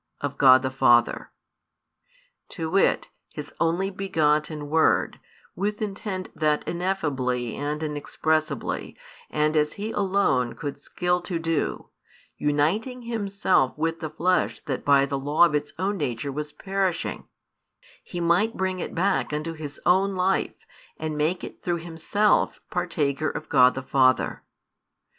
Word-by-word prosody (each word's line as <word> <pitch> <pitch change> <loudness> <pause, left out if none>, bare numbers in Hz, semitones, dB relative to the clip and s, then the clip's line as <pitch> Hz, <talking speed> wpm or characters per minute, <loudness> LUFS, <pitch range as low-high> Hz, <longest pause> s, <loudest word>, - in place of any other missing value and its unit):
of 140 -1 -3
God 130 -2 +7
the 130 - -1
Father 120 -3 +3 1.2
to 160 -3 -4
wit, 195 - +2 0.3
His 150 - -7
Only 175 +4 +1
begotten 155 -5 0
Word, 160 +2 +2 0.4
with 205 +3 -2
intent 195 -2 -4
that 150 -1 0
ineffably 135 - -1
and 150 +2 -3
inexpressibly 155 +1 -2 0.3
and 150 +1 +1
as 150 0 +2
He 210 +2 -4
alone 190 - +1
could 145 -3 -6
skill 180 0 -1
to 175 -1 -3
do, 165 -1 -2 0.5
uniting 185 - 0
Himself 200 - +1
with 165 +1 -1
the 160 -2 -4
flesh 180 +4 0
that 135 -3 -4
by 140 -1 +5
the 140 0 -3
law 145 +5 +4
of 165 - 0
its 150 0 -1
own 195 +3 -1
nature 140 -3 -2
was 150 +2 -5
perishing, 190 0 -2 0.8
He 175 - -6
might 175 +7 +2
bring 185 -1 -1
it - - -5
back 190 0 +1
unto 155 +2 -3
His 150 -3 -8
own 190 +2 +3
Life 185 +1 +1 0.4
and 155 -1 -3
make 160 +4 0
it - - -9
through 175 -1 -1
Himself 170 +5 +1
partaker 155 -4 0
of - - -6
God 130 -3 +5
the 130 - -4
Father. 130 -1 +2
160 Hz, 140 wpm, -25 LUFS, 145-185 Hz, 1.2 s, God